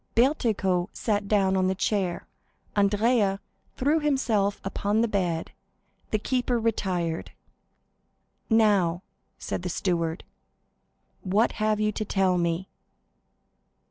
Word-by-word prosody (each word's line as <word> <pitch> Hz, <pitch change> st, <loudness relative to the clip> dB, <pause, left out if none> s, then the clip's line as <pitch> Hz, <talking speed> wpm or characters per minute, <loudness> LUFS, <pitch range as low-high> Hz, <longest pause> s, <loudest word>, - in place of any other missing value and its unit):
Bertuccio 215 Hz, -, +2 dB
sat 205 Hz, -2 st, -1 dB
down 195 Hz, -2 st, +2 dB
upon 185 Hz, -1 st, +2 dB
the 190 Hz, -, 0 dB
chair, 190 Hz, -3 st, -1 dB, 0.5 s
Andrea 205 Hz, 0 st, +2 dB, 0.4 s
threw 290 Hz, +5 st, +2 dB
himself 235 Hz, -9 st, +1 dB
upon 205 Hz, +2 st, 0 dB
the 235 Hz, -, +2 dB
bed; 180 Hz, -6 st, -1 dB, 0.6 s
the 215 Hz, -, +1 dB
keeper 245 Hz, +2 st, 0 dB
retired. 185 Hz, -7 st, -1 dB, 1.2 s
"Now," 200 Hz, -6 st, +3 dB, 0.3 s
said -, -, -4 dB
the 180 Hz, -, -4 dB
steward, 170 Hz, -2 st, -1 dB, 1.0 s
"what 205 Hz, +5 st, +2 dB
have 215 Hz, -1 st, 0 dB
you 215 Hz, 0 st, +1 dB
to 215 Hz, -, -3 dB
tell 190 Hz, -3 st, +1 dB
me?" 170 Hz, +2 st, -1 dB
200 Hz, 110 wpm, -26 LUFS, 185-220 Hz, 1.2 s, Now